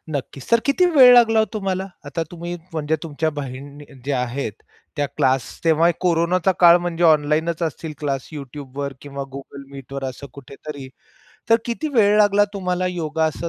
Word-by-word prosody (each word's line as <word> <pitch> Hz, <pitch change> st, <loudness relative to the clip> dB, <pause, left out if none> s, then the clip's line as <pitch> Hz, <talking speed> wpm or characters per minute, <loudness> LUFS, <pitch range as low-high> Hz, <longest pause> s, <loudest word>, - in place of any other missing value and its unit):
नक्कीच. 140 Hz, -2 st, -5 dB
सर 230 Hz, -1 st, +5 dB
किती 285 Hz, +6 st, +3 dB
वेळ 255 Hz, -3 st, +9 dB
लागला 225 Hz, -2 st, +5 dB
ओ -, -, +3 dB
तुम्हाला? 195 Hz, -2 st, -2 dB, 0.2 s
आता 165 Hz, +3 st, -3 dB
तुम्ही 175 Hz, 0 st, -6 dB, 0.2 s
म्हणजे 155 Hz, 0 st, -1 dB
तुमच्या 160 Hz, 0 st, -2 dB
बहिण 140 Hz, 0 st, -7 dB, 0.3 s
ज्या 135 Hz, -3 st, 0 dB
आहेत, 125 Hz, -3 st, -3 dB, 0.4 s
त्या 145 Hz, -1 st, 0 dB
क्लास 130 Hz, -1 st, +2 dB, 0.2 s
तेव्हा 165 Hz, +1 st, +4 dB
हे 175 Hz, -, +4 dB
कोरोनाचा 180 Hz, +1 st, +2 dB
काळ, 170 Hz, 0 st, +8 dB
म्हणजे 175 Hz, 0 st, -2 dB
ऑनलाईनच 160 Hz, +2 st, +2 dB
असतील 160 Hz, 0 st, -3 dB
क्लास? 140 Hz, -3 st, -3 dB
Youtubeवर 140 Hz, 0 st, -6 dB
किंवा 140 Hz, -1 st, -6 dB
Google 140 Hz, 0 st, -9 dB
मीटवर 135 Hz, 0 st, -7 dB
असं 130 Hz, +2 st, -6 dB
कुठेतरी. 140 Hz, 0 st, -10 dB, 0.6 s
तर 230 Hz, -, +7 dB
किती 240 Hz, +6 st, -3 dB
वेळ 210 Hz, -3 st, +4 dB
लागला 205 Hz, 0 st, +5 dB
तुम्हाला 180 Hz, -1 st, -1 dB
योगा 160 Hz, -3 st, -1 dB
असं 160 Hz, +2 st, -2 dB
160 Hz, 165 wpm, -21 LUFS, 140-180 Hz, 0.6 s, वेळ